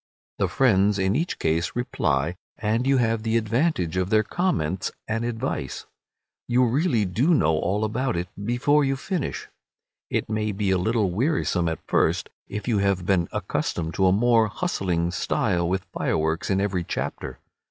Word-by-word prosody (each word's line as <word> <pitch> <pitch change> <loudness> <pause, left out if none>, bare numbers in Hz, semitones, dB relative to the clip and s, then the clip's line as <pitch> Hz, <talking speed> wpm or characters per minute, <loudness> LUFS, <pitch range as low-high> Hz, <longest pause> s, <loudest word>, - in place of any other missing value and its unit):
The - - +2
friends 105 -5 +3
in 95 +1 +1
each 165 +6 -1
case 85 +3 0
reply, 85 - 0 0.2
and 115 +4 0
you 135 0 +4
have 115 -2 +1
the 115 +1 +1
advantage 110 - 0
of 95 0 0
their 110 0 +4
comments 95 - -1 0.2
and 115 +1 -1
advice. 120 - -3 0.6
You 125 +1 +3
really 120 - +1
do 125 - +2
know 80 - +3
all 100 +7 0
about 120 +3 -1
it 90 +1 -2 0.2
before 125 +6 +2
you 135 0 +1
finish. 165 +2 -3 0.6
It - - -1
may 110 -1 -1
be 100 -1 0
a 95 - +2
little 105 0 +1
wearisome 100 - +1
at 80 - -5
first, - - +1 0.2
if 105 +3 -6
you 110 -4 +2
have 100 -2 +1
been 90 -3 +2
accustomed 80 -1 -2
to 95 - +2
a - - +5
more 115 +2 +4
hustling 90 - -1
style 85 -1 0
with 95 +1 -1
fireworks 80 +1 -1
in 95 -1 +2
every 100 -3 0
chapter. 65 -5 -4
105 Hz, 165 wpm, -24 LUFS, 90-120 Hz, 0.6 s, a